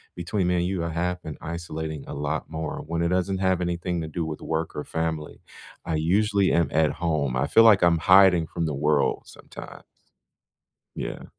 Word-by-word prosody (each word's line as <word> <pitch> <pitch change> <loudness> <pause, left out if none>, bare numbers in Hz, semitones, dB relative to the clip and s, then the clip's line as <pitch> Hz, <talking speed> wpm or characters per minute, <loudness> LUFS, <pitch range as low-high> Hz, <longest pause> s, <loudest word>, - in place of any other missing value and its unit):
between 90 +2 -2
me 90 - +1
and 85 - 0
you, 90 -2 -2
I - - -2
have 90 +2 -2
been 80 - -7
isolating 80 -2 -5
a - - -6
lot 75 +2 -3
more 80 -1 -5
when 85 +1 -2
it - - +2
doesn't 95 +1 0
have 95 -2 +1
anything 85 0 -2
to 80 - -5
do 80 +2 -4
with 80 -1 -6
work 80 0 -3
or 75 - -4
family. 80 -2 -4 0.4
I 80 - -1
usually 100 +5 +2
am 85 -1 +3
at 80 -1 +2
home. 75 -6 -1
I - - 0
feel 115 - +6
like 110 -3 +6
I'm 85 -1 +4
hiding 90 0 +6
from 85 0 -3
the 75 - -3
world 75 0 +1
sometimes. - - -12 1.1
Yeah. - - -6
85 Hz, 195 wpm, -25 LUFS, 80-90 Hz, 1.1 s, feel